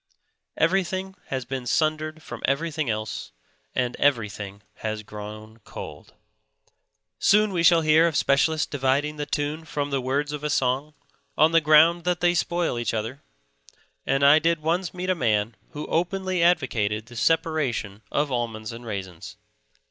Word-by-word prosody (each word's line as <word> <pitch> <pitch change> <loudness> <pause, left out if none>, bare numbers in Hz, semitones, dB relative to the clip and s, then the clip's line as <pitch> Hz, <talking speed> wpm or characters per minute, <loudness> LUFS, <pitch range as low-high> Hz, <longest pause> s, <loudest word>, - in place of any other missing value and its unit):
Everything 190 +2 0
has 130 -2 -3
been 130 -1 -5
sundered 155 +5 0
from - - -8
everything 155 0 -1
else, 110 -1 -4 0.4
and 125 -1 0
everything 105 -7 -1
has 110 -1 -4
grown 110 +1 -9
cold. 105 - -10 1.0
Soon 210 0 +4
we 175 - +1
shall 170 -1 +6
hear 155 +1 +5
of 165 - -2
specialists 150 +3 +2
dividing 145 +2 0
the 145 0 -4
tune 150 +2 -2
from 145 -2 -3
the 135 -1 0
words 140 +3 -1
of 150 -1 -5
a 150 - -1
song, 135 +2 0 0.4
on 155 +2 +5
the 165 0 +5
ground 160 +3 +5
that 180 -1 +1
they 175 0 +3
spoil 170 -6 0
each 120 - -1
other; 115 +6 -4 0.8
and 135 +1 +2
I 145 +2 +8
did 165 -1 0
once 170 +2 0
meet 185 +1 -2
a - - +4
man 110 - 0
who 150 -1 -6
openly 185 +1 -1
advocated 115 -11 +1
the 120 - -14
separation 145 - 0
of 145 -1 0
almonds 115 -3 -3
and 115 +1 -9
raisins. 100 -2 -7
145 Hz, 155 wpm, -25 LUFS, 115-165 Hz, 1.0 s, I